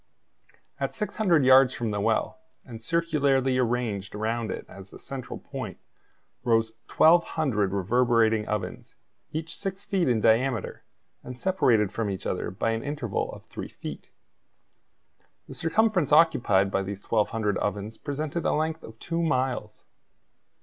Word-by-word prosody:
At -, -, -2 dB
600 190 Hz, -, +1 dB
yards 130 Hz, 0 st, +6 dB
from 115 Hz, -3 st, -2 dB
the 105 Hz, -1 st, -2 dB
well, 110 Hz, +4 st, 0 dB, 0.3 s
and 115 Hz, -3 st, -9 dB
circularly 140 Hz, -4 st, +1 dB
arranged 115 Hz, -5 st, -1 dB
around 110 Hz, +1 st, -2 dB
it -, -, -5 dB
as 95 Hz, 0 st, -12 dB
a -, -, -11 dB
central 135 Hz, -2 st, -7 dB
point, -, -, -7 dB, 0.7 s
rose 115 Hz, -2 st, +2 dB, 0.2 s
1,200 155 Hz, -, +3 dB
reverberating 110 Hz, +2 st, +2 dB
ovens, 100 Hz, -4 st, -4 dB, 0.4 s
each 160 Hz, +1 st, -4 dB
six 195 Hz, 0 st, -5 dB
feet 190 Hz, -7 st, 0 dB
in 120 Hz, -3 st, +2 dB
diameter, 115 Hz, +3 st, +1 dB, 0.4 s
and 125 Hz, 0 st, -8 dB
separated 120 Hz, -, +2 dB
from 110 Hz, -1 st, -2 dB
each 95 Hz, 0 st, -5 dB
other 90 Hz, -, -2 dB
by 100 Hz, +5 st, -1 dB
an 115 Hz, 0 st, -2 dB
interval 140 Hz, -7 st, -3 dB
of -, -, -11 dB
three -, -, -7 dB
feet. -, -, -8 dB, 1.4 s
The -, -, -9 dB
circumference 180 Hz, -, +1 dB
occupied 110 Hz, -, +4 dB
by 95 Hz, -, +1 dB
these 100 Hz, 0 st, -6 dB
1,200 105 Hz, -2 st, 0 dB
ovens 105 Hz, +2 st, -3 dB
presented 150 Hz, +3 st, -3 dB
a -, -, +1 dB
length 160 Hz, +1 st, -1 dB
of 110 Hz, 0 st, -12 dB
two 165 Hz, +7 st, -3 dB
miles. 130 Hz, -8 st, -1 dB
120 Hz, 140 wpm, -26 LUFS, 105-155 Hz, 1.4 s, yards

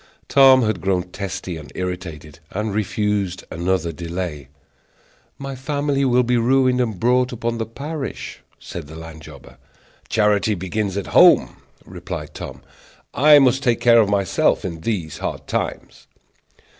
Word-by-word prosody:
Tom 135 Hz, -2 st, +6 dB
had 110 Hz, -6 st, -1 dB
grown 95 Hz, -1 st, 0 dB
testy 95 Hz, -3 st, -5 dB
and 75 Hz, -, -11 dB
irritated, 85 Hz, -4 st, -6 dB
and 105 Hz, +1 st, -3 dB
refused 105 Hz, -2 st, -1 dB
another 85 Hz, 0 st, -1 dB
delay. 85 Hz, -3 st, -5 dB, 0.9 s
"My 135 Hz, 0 st, -6 dB
family 140 Hz, +1 st, -1 dB
will 125 Hz, -1 st, +3 dB
be 125 Hz, 0 st, +1 dB
ruined, 125 Hz, +1 st, +3 dB
and 110 Hz, -6 st, -2 dB
brought 125 Hz, +2 st, +2 dB
upon 115 Hz, -1 st, -3 dB
the 115 Hz, -, -2 dB
parish," 140 Hz, +4 st, -6 dB, 0.2 s
said 85 Hz, -4 st, -8 dB
the 80 Hz, -, -11 dB
land 80 Hz, -1 st, -10 dB
jobber. -, -, -13 dB, 0.5 s
"Charity 105 Hz, 0 st, +2 dB
begins 95 Hz, +2 st, -3 dB
at 100 Hz, -, -3 dB
home," -, -, +6 dB, 0.3 s
replied -, -, -7 dB
Tom; -, -, -8 dB, 0.5 s
"I 150 Hz, +2 st, +7 dB
must 135 Hz, -1 st, +4 dB
take 120 Hz, -4 st, +1 dB
care 115 Hz, -1 st, +6 dB
of 105 Hz, -, +1 dB
myself 100 Hz, -2 st, +1 dB
in 85 Hz, -3 st, -5 dB
these 90 Hz, -7 st, -3 dB
hard -, -, -4 dB
times." -, -, -4 dB
105 Hz, 145 wpm, -21 LUFS, 90-125 Hz, 0.9 s, I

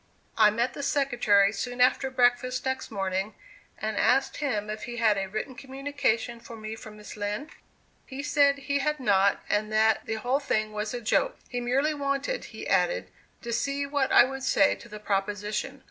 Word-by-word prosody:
I 215 Hz, -2 st, +6 dB
met 235 Hz, +4 st, -1 dB
the -, -, -6 dB
secretary 240 Hz, -8 st, +3 dB
soon 245 Hz, +4 st, -4 dB
after 255 Hz, +2 st, +3 dB
breakfast 255 Hz, 0 st, +1 dB
next 260 Hz, 0 st, -2 dB
morning 195 Hz, 0 st, -2 dB, 0.4 s
and 215 Hz, -1 st, -3 dB
asked 265 Hz, +1 st, +2 dB
him 215 Hz, -8 st, -1 dB
if 215 Hz, 0 st, -5 dB
he 240 Hz, 0 st, -6 dB
had 220 Hz, -2 st, +3 dB
a 195 Hz, -1 st, -2 dB
written 215 Hz, +6 st, -4 dB
communication 265 Hz, -3 st, -2 dB
for 230 Hz, -, -11 dB
me 215 Hz, 0 st, -6 dB
from 215 Hz, -1 st, -11 dB
Miss 210 Hz, +2 st, -10 dB
Lind? 210 Hz, +8 st, -4 dB, 0.6 s
He 275 Hz, +1 st, -6 dB
said 285 Hz, -1 st, +3 dB
he 280 Hz, 0 st, +1 dB
had 300 Hz, +1 st, 0 dB
not 200 Hz, -5 st, +2 dB
and 215 Hz, +1 st, 0 dB
that 220 Hz, 0 st, +3 dB
the 220 Hz, -, -1 dB
whole 245 Hz, +5 st, 0 dB
thing 215 Hz, -6 st, -1 dB
was 210 Hz, +3 st, -3 dB
a 240 Hz, -, -4 dB
"joke." -, -, +1 dB
He 245 Hz, -, -3 dB
merely 270 Hz, +5 st, +1 dB
wanted, 280 Hz, -, -2 dB
he -, -, -9 dB
added, -, -, +1 dB, 0.3 s
to 235 Hz, -1 st, -3 dB
see 275 Hz, +4 st, -1 dB
what 280 Hz, -1 st, 0 dB
I -, -, +8 dB
would 270 Hz, +1 st, -4 dB
say 265 Hz, +2 st, +3 dB
to 235 Hz, -, -12 dB
the 210 Hz, -1 st, -8 dB
proposition. 210 Hz, +6 st, -2 dB
240 Hz, 190 wpm, -27 LUFS, 215-275 Hz, 0.6 s, I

